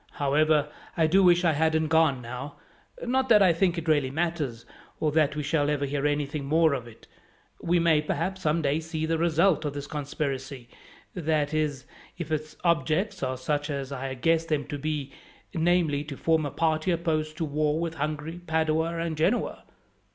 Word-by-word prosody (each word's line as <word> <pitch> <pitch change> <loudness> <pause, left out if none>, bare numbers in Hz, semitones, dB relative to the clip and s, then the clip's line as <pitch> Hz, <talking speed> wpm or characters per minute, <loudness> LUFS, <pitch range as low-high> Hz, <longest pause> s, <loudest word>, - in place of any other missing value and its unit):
However, 150 +1 +2 0.3
I 165 - +4
do 185 +5 +4
wish 175 -1 +5
I 165 - +5
hadn't 160 +1 +1
gone 160 -5 +3
now; 125 +4 -7 0.5
not 260 +1 +1
that 210 -3 +7
I 180 -3 +5
think 175 +1 +1
it 165 0 -4
really 145 -4 +2
matters, 145 -6 -2 0.3
or 155 - +1
that 150 -1 +2
we 150 - -2
shall 145 0 +1
ever 145 -1 0
hear 140 +1 -1
anything 145 0 -2
more 160 +1 +3
of 125 -3 -4
it. 115 - -15 0.6
We 175 +1 +2
may, 165 -3 +3
perhaps, 190 +5 -2
some 160 0 +1
day 145 +2 +1
see 160 -1 -3
the 160 0 0
result 170 0 +3
of 145 -2 -2
this 145 0 -5
conspiracy, 140 -3 -4 0.4
that 155 -3 0
is, 150 -4 -1 0.3
if 170 -3 -6
its 155 0 -3
objects 170 +5 +1
are 130 -1 -2
such 145 +3 -2
as 140 -2 -4
I 135 0 -4
guess 165 +5 +2
them 155 -3 -1
to 145 - -4
be; 150 -2 -3 0.4
namely, 165 -4 +2
to 140 -2 -7
form 160 -2 +1
a - - -4
party 160 +2 0
opposed 155 -3 -1
to 165 - -1
war 150 +1 0
with 165 -1 -2
Hungary, 155 +3 -4
Padua, 160 +1 +1
or 165 0 -1
Genoa." 160 +9 0
155 Hz, 185 wpm, -27 LUFS, 145-165 Hz, 0.6 s, that